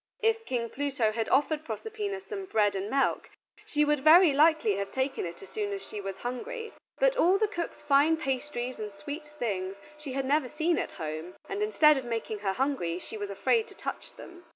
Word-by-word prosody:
If 450 0 +2
King 235 -2 -1
Pluto 275 -6 0
had 225 0 -2
offered 295 +3 +2
Proserpina 400 - -4
some 395 -1 -6
bread 210 - +2
and 195 +2 -3
milk 275 +3 +1 0.4
she 300 0 +2
would 295 -1 +2
very 325 0 +8
likely 300 -7 +4
have 200 0 -3
taken 265 -7 -1
it 170 - -9
as - - -12
soon 420 -2 -3
as 395 - -6
she 210 - -6
was 195 -1 -5
hungry, 445 - -5 0.2
but - - +3
all 370 -2 +5
the 430 +1 +2
cook's 345 -5 -5
fine 290 +3 +4
pastries 260 -3 -3
and 210 -1 -4
sweets 285 +10 -7
were - - -21
things 195 -6 -2 0.2
she 290 -4 -6
had 270 0 -1
never 280 -1 +2
seen 330 +4 +1
at - - -4
home, 160 +2 -5
and, 395 +1 -3
instead 310 -9 +5
of 265 - -4
making 225 -2 -3
her 195 -1 -1
hungry, 255 -10 -1
she 185 - -9
was 205 -1 -4
afraid 440 - +1
to - - -14
touch - - -6
them. 350 0 -12
280 Hz, 210 wpm, -29 LUFS, 215-350 Hz, 0.4 s, very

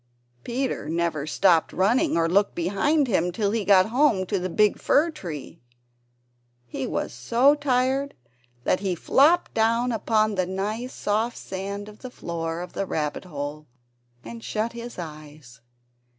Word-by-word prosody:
Peter 250 - -3
never 165 -3 -1
stopped 170 0 +3
running 240 - +2
or 165 0 +2
looked 200 +4 +2
behind 205 - +1
him 180 -5 +1
till 200 +2 -1
he 225 -1 -1
got 190 -2 +5
home 240 -6 +3
to 195 +1 -1
the 185 +1 -3
big 210 +3 +2
fir 320 +4 +3
tree. 165 - -8 1.0
He 125 +2 -4
was - - -3
so 235 - +3
tired 270 -1 0 0.5
that 185 - +1
he 190 -2 -1
flopped 305 - +3
down 230 +2 +2
upon 215 -1 +1
the 185 -2 0
nice 210 +7 -3
soft 220 +2 -1
sand 200 +2 -5
on 210 0 -12
the 255 - -7
floor 165 -6 -4
of 180 - -8
the 195 - -3
rabbit 150 +2 -3
hole, 150 -2 -6 0.6
and 230 -1 -9
shut 220 +2 -2
his 235 0 -8
eyes. 150 -7 -10
200 Hz, 150 wpm, -25 LUFS, 170-235 Hz, 1.0 s, got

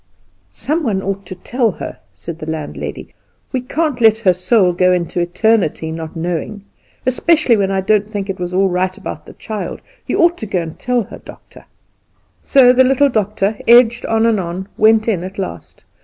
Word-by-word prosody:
"Some 310 +4 -2
one 205 -9 -1
ought 195 -1 -4
to 185 - -7
tell 230 +3 -1
her," - - -8 0.2
said 165 -1 -8
the 155 - -6
landlady; 155 -2 -6 0.4
"we 260 - -1
can't 280 0 -2
let 220 -1 +6
her 200 -5 +3
soul 185 0 +2
go 180 +1 +3
out 180 - +4
into 175 0 -2
eternity 175 -3 +1
not 160 -1 -7
knowing, 175 +5 -4 0.4
especially 270 0 +3
when 200 -2 0
I 195 -1 0
don't 210 +1 +1
think 205 -2 -4
it 195 -2 -5
was 180 0 -3
all 190 +2 +2
right 185 +1 -1
about - - -8
the - - -11
child. 215 -2 -6 0.3
You - - -1
ought 345 0 +3
to 220 - -5
go 190 -2 -1
and 160 -1 -9
tell 250 -2 0
her, - - -11
doctor." - - -15 0.8
So, 255 -3 +5
the 260 +1 +5
little 270 +2 +3
doctor, 215 -2 -1
edged 235 0 +6
on 225 0 +2
and 225 -3 +2
on, 185 +2 -5
went 220 +1 +4
in 190 -6 0
at 190 +1 -8
last. 195 - -7
205 Hz, 195 wpm, -17 LUFS, 180-235 Hz, 0.8 s, let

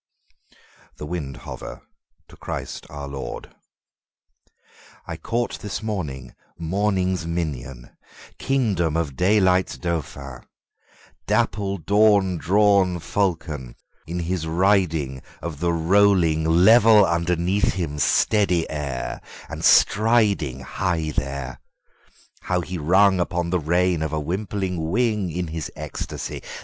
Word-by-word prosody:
The - - -6
Windhover 75 -5 -7 0.5
To - - -14
Christ - - -6
our 70 -1 -7
LordI 70 -3 -7 1.7
CAUGHT 120 +1 -2
this 105 +1 -5
morning 75 - -4 0.2
morning's 95 0 -1
minion, 70 -7 -4 0.5
king 130 -6 +1
dom 85 -3 0
of 75 -5 -2
daylight's 95 +2 +2
dauphin, 70 -6 -5 0.9
dapple 100 -2 0
dawn 100 0 +3
drawn 100 -1 +3
Falcon, 80 -6 -2 0.3
in 85 +2 -3
his 85 -1 -2
ridingOf 80 -4 0
the 85 +3 0
rolling 85 -2 +3
level 105 +5 +6
underneath 85 +3 +1
him 75 -5 -3
steady 90 +1 +2
air, 70 -4 -4 0.3
and - - -6
stridingHigh 90 - +2
there, 70 -2 -4 0.8
how 90 -1 -1
he 90 +1 -5
rung 95 +5 +4
upon 85 -1 -1
the 90 - +2
rein 85 +1 +1
of 80 -1 -2
a 80 - 0
wimpling 95 +3 -3
wingIn 90 -2 -1
his 80 -2 -4
ecstasy! 75 -1 -6
85 Hz, 100 wpm, -23 LUFS, 75-100 Hz, 1.7 s, level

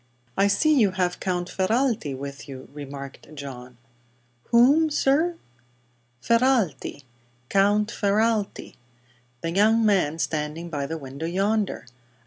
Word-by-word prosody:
"I 195 - +3
see 310 +10 +3
you 215 -10 +3
have 180 -1 -1
Count 180 -2 -2
Ferralti 210 - 0
with 140 +1 -8
you," 130 -1 -9
remarked 140 -1 -9
Uncle 155 - -14
John. 125 -3 -9 0.7
"Whom, 280 +7 +5
sir?" 305 +4 +2 0.8
"Ferralti 230 - +1 0.5
Count 205 +2 +3
Ferralti. 215 0 0 0.6
The 165 - -2
young 220 +5 +4
man 180 -7 +2
standing 160 +1 -3
by 140 -3 -2
the 165 - -4
window, 140 +2 -6
yonder." 200 +2 0
190 Hz, 115 wpm, -25 LUFS, 150-225 Hz, 0.8 s, Whom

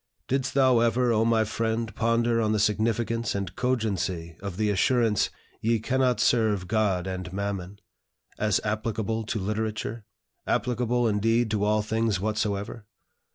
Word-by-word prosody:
Did'st 135 0 -1
thou 130 -3 +5
ever, 120 +1 +2
O 110 0 +3
my 115 -1 +3
friend! 110 +1 -2
ponder 115 0 +1
on 110 -1 +1
the 105 - +1
significance 115 +2 0
and 95 -2 -4
cogency 95 -9 -1
of 100 -2 -5
the 105 -1 +1
assurance, 115 0 +2 0.3
'Ye 115 +1 +2
cannot 125 0 +1
serve 110 -7 +2
God 100 -4 +1
and 95 -1 -5
Mammon,' 100 -1 -4 0.6
as 105 -1 +2
applicable 110 +1 -2
to 110 - -2
literature, 110 +2 -3 0.4
applicable, 120 0 +1
indeed, 115 +2 +1
to 105 -2 0
all 105 0 +2
things 110 -2 0
whatsoever? 105 +1 -2
110 Hz, 140 wpm, -26 LUFS, 105-115 Hz, 0.6 s, thou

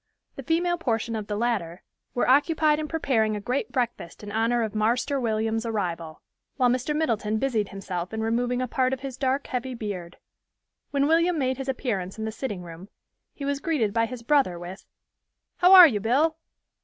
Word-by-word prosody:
The - - -6
female 345 +1 0
portion 230 -5 -1
of 215 -2 -4
the 210 - -2
latter 205 -7 -2 0.3
were 245 - +1
occupied 300 +3 +3
in 305 - -3
preparing 235 -9 0
a - - -3
great 255 - -2
breakfast 235 -8 -3
in 205 - -7
honor 230 +2 +1
of 220 -1 -3
"Marster 240 +6 +1
William's" 225 -1 -1
arrival, 175 -8 -4 0.3
while 250 -3 +3
Mr. 255 +4 -1
Middleton 220 -8 0
busied 220 -5 0
himself 185 -3 -5
in 220 0 -3
removing 245 +2 0
a - - -2
part 255 +1 0
of 265 - -4
his 270 -2 -6
dark, 270 +1 -1
heavy 255 0 -4
beard. 190 -6 -6 0.7
When 280 -1 +1
William 335 +3 +3
made 260 -2 0
his 270 0 -5
appearance 210 -8 -3
in 220 - -4
the 220 - -3
sitting 210 -6 -5
room, 170 +3 -11 0.5
he 280 - -6
was 280 0 -1
greeted 270 -10 0
by 230 0 +2
his 250 -1 -8
brother 265 -9 +2
with, 175 +3 -9 0.7
"How 360 +1 +5
are 365 -2 +12
you, 220 -8 -1
Bill? 275 +10 +2
240 Hz, 190 wpm, -25 LUFS, 210-275 Hz, 0.7 s, are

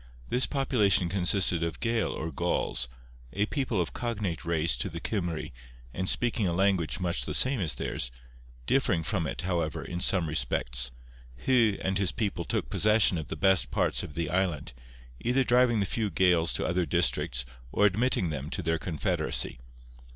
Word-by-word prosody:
This 125 - +3
population 110 - +2
consisted 90 -1 +2
of 85 0 -3
Gael 115 -1 0
or 80 +1 -4
Gauls, 85 -6 0 0.5
a 100 +1 +1
people 130 -4 -1
of 85 - -1
cognate 105 -8 -3
race 85 -4 +1
to - - -1
the 85 - -6
Cymry, 85 -5 -3 0.4
and 95 0 -1
speaking 115 -4 +1
a 85 - 0
language 95 -2 +1
much 90 -1 -1
the - - -2
same 130 -1 +2
as 85 -6 -1
theirs, - - -2 0.6
differing 90 - +1
from 85 -2 -1
it, 70 - -4
however, 85 -4 -2
in 85 - -4
some 90 -4 +3
respects. 60 -3 0 0.6
Hu 115 -6 +3
and 95 0 0
his 100 -3 +2
people 100 -6 -2
took - - -1
possession 105 - +3
of 75 - -6
the - - -5
best 95 -2 +3
parts - - +1
of 70 - -8
the 80 -1 -2
island, 90 -8 -1 0.5
either 125 +3 +1
driving 120 -2 +3
the - - +1
few 110 +2 -1
Gaels 90 -2 +3
to - - -1
other 90 -1 0
districts - - 0 0.3
or 105 - +3
admitting 105 -4 +1
them 75 0 -5
to 95 - -3
their 80 0 0
confederacy. 75 -6 -1
90 Hz, 175 wpm, -28 LUFS, 80-105 Hz, 0.6 s, This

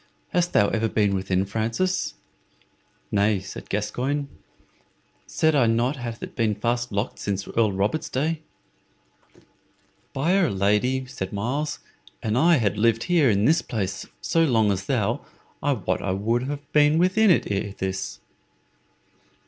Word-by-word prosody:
Hast 175 0 0
ever 110 +2 +2
been 105 -2 +2
within, 95 0 0
Francis?" 115 - -1 1.0
"Nay," 100 0 +2
said 95 +1 -9
Gascoyne; 135 +7 -2 1.0
"said 160 0 +2
I 135 -5 +4
not 120 +5 +1
it - - -10
hath 120 -1 -6
been 110 -2 +1
fast 120 +3 -1
locked 100 +4 -2
since 100 -1 -3
Earl 110 -3 +1
Robert's 100 +11 -1
day?" 155 +4 -1 1.7
"By'r 175 +6 +2
Lady," 105 +7 +1
said 125 -7 -6
Myles, 135 +9 -2 0.5
"an 110 0 0
I 165 +7 +5
had 105 -4 0
lived 115 +1 +3
here 170 -7 +3
in 100 0 +2
this 160 +5 +4
place 100 -5 -4
so 165 - +2
long 115 -8 +3
as 95 0 -3
thou, - - 0 0.4
I 145 - +2
wot 95 -6 -2
I 95 - -1
would 115 +6 0
have 145 0 -6
been 150 +1 +5
within 185 +5 +4
it 170 - +3
ere 100 0 -2
this." 95 0 -4
115 Hz, 140 wpm, -24 LUFS, 100-145 Hz, 1.7 s, I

